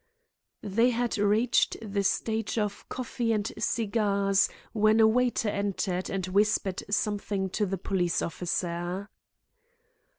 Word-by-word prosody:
They 225 +4 +3
had 240 -2 -1
reached 210 +4 +2
the 200 -2 -2
stage 220 +3 -1
of 210 -2 -2
coffee 240 -2 -2
and 210 0 -1
cigars 200 -3 +1 0.2
when 215 0 +4
a 220 - +7
waiter 240 -1 +2
entered 195 -2 -2
and 195 -2 -2
whispered 195 0 +1
something 205 -2 -1
to 210 0 0
the 195 +1 -2
police 175 -2 0
officer. 175 +3 -3
205 Hz, 120 wpm, -28 LUFS, 195-220 Hz, 0.2 s, a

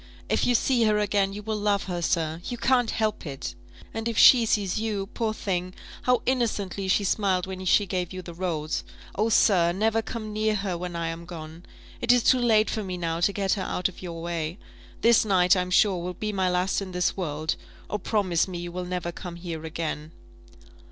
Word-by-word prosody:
If - - +2
you 245 - +3
see 240 0 +3
her 210 -1 +3
again, 205 -1 +1
you 205 +1 -7
will 215 0 -2
love 205 -1 +1
her, 175 -2 -4
sir 165 -1 0
you 245 - -4
can't 245 -2 +2
help 215 -1 -1
it; 135 - -5 0.4
and 225 +1 -3
if 230 -2 -2
she 240 -3 +8
sees 205 -2 +1
you 215 -3 -2
poor 225 -2 -1
thing, 185 -4 -3 0.3
how 250 -1 +2
innocently 210 -6 -1
she 195 +2 +2
smiled 190 -2 +1
when 185 0 -6
she 205 +3 +4
gave 180 -2 -2
you 185 -1 -6
the 170 - -8
rose! 165 -3 -2 0.3
oh, 215 +3 +1
sir, 180 -6 +4
never 220 +4 +1
come 215 -1 -6
near 215 0 +1
her 195 -3 -2
when 175 0 -5
I 165 -1 -2
am 165 +1 -6
gone! 165 0 -9 0.3
It 240 - +4
is 245 -1 +4
too 255 - +5
late 220 -3 +3
for 220 - -2
me 185 -2 -4
now 165 -1 -2
to 175 +4 +3
get 195 -1 0
her 200 - -2
out 185 0 -1
of 190 - -13
your 170 -2 -6
way. 170 0 -3 0.4
This 235 -1 +5
night, 185 -3 +4
I'm 180 -1 -1
sure, 185 -1 +3
will 180 +1 -4
be 215 -1 -3
my 190 -2 +1
last 180 +3 +1
in 190 -2 -6
this 180 0 +1
world 155 -4 -2 0.3
oh, 210 - -3
promise 185 -5 +1
me 180 -2 -5
you 175 0 -5
will 180 +1 -4
never 180 -1 -3
come 175 0 -8
here 170 -2 -6
again!" 160 -1 -4
185 Hz, 215 wpm, -26 LUFS, 175-215 Hz, 0.4 s, she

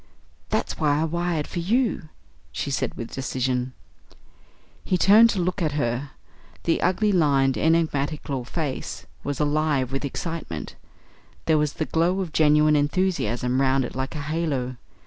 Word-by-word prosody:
"That's - - -2
why 145 -1 +2
I - - +1
wired 170 -1 -1
for - - -5
you," 205 -2 0 0.4
she 140 - -3
said - - -1
with 115 - -6
decision. 130 -1 -2 1.1
He 185 - +1
turned 215 +6 +7
to 205 - -1
look 180 +2 -1
at 155 -3 0
her. 130 -1 -1 0.5
The 165 - +1
ugly, 195 +4 +2
lined, 140 -7 +3
enigmatical 150 -4 0
face 145 +1 -4 0.2
was 145 -1 -3
alive 150 -3 +1
with 135 +1 -2
excitement. 140 - -5 0.7
There 160 -2 +3
was 150 -1 0
the 160 - -2
glow 170 +5 +1
of 180 -5 -4
genuine 150 0 +4
enthusiasm 145 - 0
round 135 -1 +2
it - - -7
like 130 +4 -4
a 150 - -3
halo. 140 -5 -2
150 Hz, 145 wpm, -24 LUFS, 135-170 Hz, 1.1 s, turned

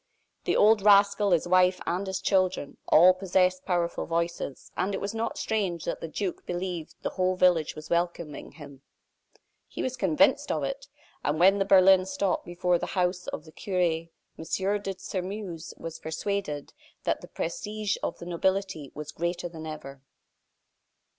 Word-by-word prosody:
The - - +1
old 215 0 +5
rascal, 200 0 +5
his 175 -2 +2
wife, 180 0 +4
and 185 +3 -1
his 190 -1 -2
children, 185 -6 +1
all 180 +4 +7
possessed 185 0 +1
powerful 175 -2 -1
voices; 170 -4 -3
and 195 +2 -1
it - - -3
was 200 +2 -3
not 225 +1 -2
strange 190 -7 -1
that - - -3
the - - -4
duke 185 +3 -4
believed 175 -2 -4
the - - -1
whole 185 0 +1
village 180 -4 +3
was 155 0 -10
welcoming 170 -3 -2
him. 140 -3 -12 0.9
He - - -5
was 260 0 -2
convinced 255 - +3
of - - -1
it; - - -4 0.4
and 150 +2 0
when 195 +3 +6
the 195 - +2
berlin 190 -1 +6
stopped 190 0 -1
before 175 0 +1
the - - -3
house 180 0 0
of 150 - -5
the 155 - -13
cure, 170 -3 -1 0.3
M. - - -5 0.4
de 195 -1 -4
Sairmeuse 185 -3 -5
was 165 -1 -7
persuaded 160 -2 -3 0.3
that - - 0
the - - -10
prestige 210 +5 -3
of - - -3
the - - -9
nobility 185 -3 -1
was 150 0 -6
greater 170 +2 -2
than 160 -1 -8
ever. 140 -3 -8
180 Hz, 165 wpm, -27 LUFS, 165-195 Hz, 0.9 s, all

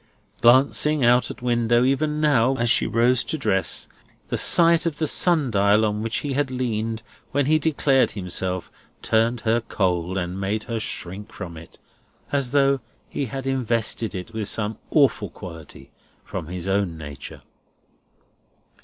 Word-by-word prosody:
Glancing 135 +3 +4
out 125 +1 +4
at - - -9
window, 120 -1 +2
even 150 +3 0
now, 135 -4 +3
as 120 -1 +1
she - - +3
rose 120 +1 +2
to 160 - -3
dress, 95 - 0 0.4
the - - -1
sight 170 0 +5
of 160 - -3
the 160 - 0
sun 155 -4 +3
dial 100 +1 +3
on 105 0 -2
which 115 +1 -1
he 145 -2 -3
had 140 0 0
leaned 115 -3 -3 0.3
when 145 -1 +2
he 155 +2 +3
declared 140 -3 +2
himself, 95 -1 -3 0.3
turned 115 +2 +1
her 115 +1 +1
cold, 90 -4 -1
and 90 +1 -4
made 105 +3 -2
her 115 -2 -4
shrink 100 -1 -5
from 85 -4 -8
it, 80 +1 -13 0.5
as 140 -3 0
though 140 0 +2 0.3
he 140 - -3
had 135 +2 -6
invested 115 -4 0
it 90 -1 -7
with 110 -2 -2
some 105 0 -1
awful 135 - +2
quality 85 -4 -11 0.3
from 80 - -6
his 90 +1 -5
own 95 -4 0
nature. 75 -3 -9
115 Hz, 155 wpm, -23 LUFS, 100-135 Hz, 0.5 s, sight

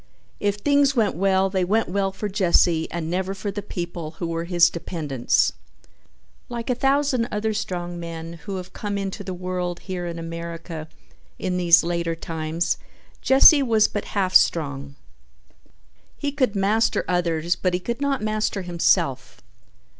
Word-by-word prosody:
If 205 -1 0
things 280 +5 +2
went 220 -5 +2
well 190 +1 +2
they 190 -2 +1
went 215 +5 +1
well 195 +1 0
for 200 +2 -4
Jesse 175 -4 +2
and 170 -2 -4
never 190 +3 -2
for 200 +1 -4
the 205 +1 -5
people 170 -5 -6
who 170 - -3
were 165 0 -3
his 175 -1 +5
dependents. 150 -7 0 1.0
Like 235 0 -3
a - - +3
thousand 270 -1 +1
other 215 +1 -1
strong 175 -5 -4
men 165 0 -7
who 200 - -3
have 185 0 -7
come 205 -1 -3
into 195 +1 -4
the 185 -1 -5
world 180 -1 -3
here 180 -2 -5
in 170 0 -5
America 165 -1 -6 0.5
in 185 -1 -2
these 175 -1 +6
later 170 -1 -1
times, 165 0 -2 0.4
Jesse 275 +2 +7
was 225 -5 +3
but 205 - -4
half 185 -2 +1
strong. 140 -3 +2 1.2
He 285 -1 -2
could 255 -7 0
master 210 +4 +1
others 170 -1 0
but 180 -1 0
he - - -1
could 235 +7 -4
not 275 -4 0
master 215 -2 -1
himself. 170 -6 0
185 Hz, 155 wpm, -23 LUFS, 170-210 Hz, 1.2 s, Jesse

